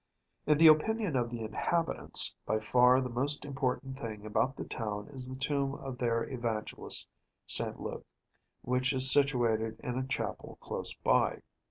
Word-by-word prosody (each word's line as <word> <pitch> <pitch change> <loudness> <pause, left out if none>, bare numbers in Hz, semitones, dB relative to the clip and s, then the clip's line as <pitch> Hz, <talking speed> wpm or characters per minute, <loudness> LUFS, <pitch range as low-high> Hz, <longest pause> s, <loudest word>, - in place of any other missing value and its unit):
In 150 - +4
the 165 - +4
opinion 180 +3 +3
of 120 -2 0
the 120 -1 -6
inhabitants, 160 +10 +3
by 110 - 0
far 125 +4 +3
the 130 - -3
most 140 +5 -2
important 135 -1 -4
thing 110 -5 -7
about 120 +5 -1
the - - -6
town 105 -3 -5
is 130 -3 -5
the 130 - -7
tomb 140 0 -2
of 135 -2 -8
their 115 -1 -1
Evangelist 115 -4 +1 0.4
S. - - +5 0.2
Luke, - - -7 0.6
which 130 +2 0
is 130 0 +5
situated 115 -6 +1
in 125 0 -3
a 130 - -4
chapel - - -5
close - - -4
by. - - 0
130 Hz, 160 wpm, -30 LUFS, 115-140 Hz, 0.6 s, S